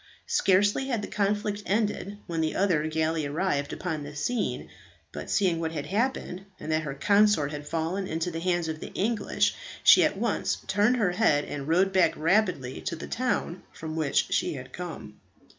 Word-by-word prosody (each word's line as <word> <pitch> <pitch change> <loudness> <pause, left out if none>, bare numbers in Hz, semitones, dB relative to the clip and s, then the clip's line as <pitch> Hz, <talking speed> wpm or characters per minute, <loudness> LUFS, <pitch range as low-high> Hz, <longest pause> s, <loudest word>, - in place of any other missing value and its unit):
Scarcely 205 - +2
had 235 -6 -1
the - - -4
conflict 205 0 -1
ended 205 -1 -1
when 165 -1 -2
the 155 -1 -1
other 170 -6 +2
galley 160 -1 0
arrived 145 -2 -1
upon 160 -5 -3
the 145 0 -8
scene; 240 +11 -2 0.4
but - - -7
seeing 180 -5 +2
what 165 -1 -2
had 145 -3 -4
happened, 205 -3 -2 0.2
and 155 - -5
that 155 0 +2
her 140 -3 -5
consort 200 -1 +3
had 145 -1 -7
fallen 165 +5 -2
into 165 +1 -2
the 165 - -4
hands 175 -1 0
of 160 -1 -4
the - - -8
English, 220 +2 +1 0.3
she - - +8
at - - +1
once - - 0
turned 215 +5 +2
her 205 -6 +2
head, 175 -7 +2
and 140 -1 -6
rowed 185 +4 +3
back 185 -1 +3
rapidly 165 -7 +1
to 170 - -3
the 160 - -7
town 225 -8 -2
from 160 0 -7
which 150 -4 +1
she - - 0
had 130 -1 -9
come. 130 -13 -7
175 Hz, 185 wpm, -27 LUFS, 155-205 Hz, 0.4 s, she